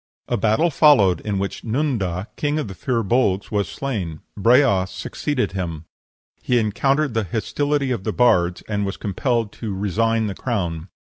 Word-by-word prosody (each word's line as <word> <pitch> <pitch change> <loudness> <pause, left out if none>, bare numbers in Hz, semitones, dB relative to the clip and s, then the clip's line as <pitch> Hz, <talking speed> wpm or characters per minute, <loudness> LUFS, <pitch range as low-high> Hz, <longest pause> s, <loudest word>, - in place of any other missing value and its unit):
A 120 - 0
battle 110 - +2
followed, 130 - +5
in 105 -2 -2
which 100 0 -3
Nunda, 110 - -1
king 145 0 -1
of 155 - -2
the 95 - -7
Fir 115 +4 -1
Bolgs, 100 -3 +1
was 100 -4 0
slain; 95 - -4
Breas 110 -3 +4
succeeded 145 +2 -2
him; 85 -4 -4 0.6
he 125 - +1
encountered 135 +6 +1
the 110 -2 0
hostility 140 - -1
of 115 -6 -2
the - - -1
bards, 90 -8 +2
and 105 -1 -1
was 95 -1 -3
compelled 115 +2 -1
to 105 -4 -5
resign 110 +3 +1
the 100 - -2
crown. 90 -9 -3
110 Hz, 160 wpm, -22 LUFS, 95-125 Hz, 0.6 s, followed